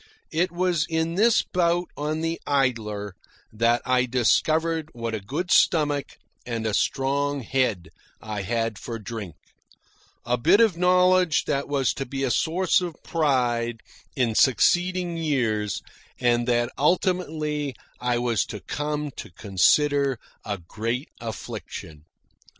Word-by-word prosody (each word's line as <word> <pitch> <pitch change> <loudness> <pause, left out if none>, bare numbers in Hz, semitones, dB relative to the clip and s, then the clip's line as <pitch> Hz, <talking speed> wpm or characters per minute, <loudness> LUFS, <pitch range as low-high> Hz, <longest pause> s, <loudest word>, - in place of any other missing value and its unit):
It 175 +3 +1
was 175 -3 0
in 160 0 0
this 220 +5 +4
bout 175 -1 0
on 155 +2 -2
the 165 +1 -2
Idler 110 -8 0 0.4
that 115 +2 +2
I 125 0 +2
discovered 155 +6 +1
what 115 -1 -4
a 110 - -2
good 150 - -4
stomach 145 -4 +2 0.3
and 115 -2 -4
a 110 - 0
strong 140 +4 0
head 115 -7 0 0.3
I 105 -2 -5
had 115 +1 -2
for 115 - -5
drink 105 -6 -7 0.9
a 120 0 0
bit 200 - +5
of 225 -6 +4
knowledge 180 -2 +4
that 140 -1 -1
was 140 -3 +1
to 135 - -5
be 135 +2 -3
a 130 - +1
source 180 +7 +2
of 175 -3 -4
pride 120 -7 0 0.3
in 120 -4 +1
succeeding 175 +8 +3
years, 120 - -1 0.4
and 120 -1 +2
that 120 -1 +1
ultimately 155 - 0 0.2
I 125 -1 0
was 120 -2 +1
to 105 - -6
come 150 +2 -3
to - - -7
consider 135 - +2 0.3
a 100 -1 -3
great 115 - -4
affliction. 80 -8 -7
135 Hz, 135 wpm, -25 LUFS, 115-160 Hz, 0.9 s, bit